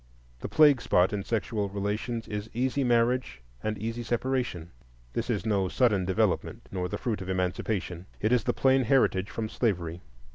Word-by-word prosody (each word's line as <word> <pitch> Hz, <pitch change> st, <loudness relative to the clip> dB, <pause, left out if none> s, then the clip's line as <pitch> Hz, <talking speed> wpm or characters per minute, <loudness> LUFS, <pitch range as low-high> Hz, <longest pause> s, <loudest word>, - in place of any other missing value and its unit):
The -, -, -5 dB
plague 145 Hz, -5 st, +5 dB
spot 90 Hz, -2 st, +3 dB
in 100 Hz, -1 st, -2 dB
sexual 110 Hz, -2 st, -1 dB
relations 105 Hz, +4 st, -3 dB
is 105 Hz, 0 st, -5 dB
easy 130 Hz, +3 st, +1 dB
marriage 120 Hz, -, +1 dB, 0.2 s
and 110 Hz, -1 st, -2 dB
easy 115 Hz, +3 st, -4 dB
separation. 120 Hz, -8 st, -2 dB, 0.4 s
This -, -, -2 dB
is -, -, -1 dB
no 100 Hz, -4 st, +1 dB
sudden 105 Hz, -4 st, +2 dB
development, 95 Hz, 0 st, 0 dB
nor 90 Hz, -1 st, -2 dB
the -, -, -3 dB
fruit 115 Hz, -6 st, -2 dB
of 95 Hz, -, -6 dB
Emancipation. 90 Hz, 0 st, -2 dB
It 110 Hz, -, +1 dB
is 125 Hz, -4 st, +3 dB
the -, -, +3 dB
plain 130 Hz, -1 st, +3 dB
heritage 110 Hz, -6 st, +2 dB
from 110 Hz, -1 st, -3 dB
slavery. 90 Hz, -7 st, -1 dB
110 Hz, 170 wpm, -28 LUFS, 95-120 Hz, 0.4 s, plague